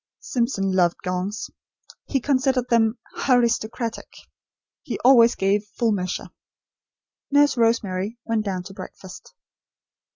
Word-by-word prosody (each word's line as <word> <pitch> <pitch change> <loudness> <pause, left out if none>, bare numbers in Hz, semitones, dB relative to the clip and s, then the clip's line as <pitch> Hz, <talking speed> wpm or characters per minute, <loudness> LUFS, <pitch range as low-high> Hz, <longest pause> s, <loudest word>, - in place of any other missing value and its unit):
Simpson 235 -6 -1
loved 175 -2 +2
gongs. 185 +3 -3 0.6
He 275 - 0
considered 260 -1 +1
them 230 0 +3 0.2
"Haristocratic." 235 -2 0 0.7
He - - -5
always 240 -2 +7
gave 200 +2 0
full 230 -2 +2
measure. 185 -3 -3 1.0
Nurse 290 0 +4
Rosemary 225 -3 0
went 225 -2 0
down 190 -3 -3
to 195 - -10
breakfast. 190 0 -11
225 Hz, 105 wpm, -23 LUFS, 195-245 Hz, 1.0 s, always